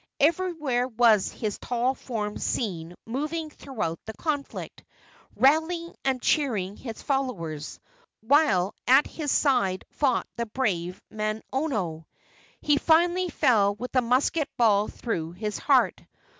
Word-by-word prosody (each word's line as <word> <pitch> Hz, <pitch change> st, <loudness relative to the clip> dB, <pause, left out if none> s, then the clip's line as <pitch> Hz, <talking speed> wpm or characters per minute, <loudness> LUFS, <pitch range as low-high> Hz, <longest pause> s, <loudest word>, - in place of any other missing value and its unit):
Everywhere 305 Hz, -6 st, +1 dB
was 225 Hz, -4 st, +3 dB
his 215 Hz, -3 st, -4 dB
tall 250 Hz, +1 st, 0 dB
form 215 Hz, -5 st, -4 dB
seen 175 Hz, -6 st, -2 dB
moving 305 Hz, +6 st, -3 dB
throughout 215 Hz, -, -4 dB
the 220 Hz, -, -5 dB
conflict, 295 Hz, -4 st, -4 dB, 0.5 s
rallying 325 Hz, +5 st, +2 dB
and 265 Hz, -1 st, +1 dB
cheering 220 Hz, -11 st, 0 dB
his 225 Hz, -2 st, -8 dB
followers, 190 Hz, -, -3 dB, 0.4 s
while 220 Hz, -, +3 dB
at 265 Hz, +4 st, +6 dB
his 300 Hz, -4 st, -4 dB
side 240 Hz, -10 st, +2 dB
fought 265 Hz, -5 st, +1 dB
the 235 Hz, 0 st, -2 dB
brave 185 Hz, -7 st, -2 dB
Manono. 215 Hz, -, -2 dB, 0.5 s
He 295 Hz, -1 st, +3 dB
finally 350 Hz, +3 st, +3 dB
fell 205 Hz, -9 st, +3 dB
with 250 Hz, +5 st, -7 dB
a 255 Hz, -, +5 dB
musket 260 Hz, +5 st, +1 dB
ball 210 Hz, -4 st, +4 dB
through 170 Hz, -8 st, -4 dB
his 210 Hz, +3 st, -4 dB
heart. -, -, +3 dB
245 Hz, 120 wpm, -26 LUFS, 205-290 Hz, 0.5 s, at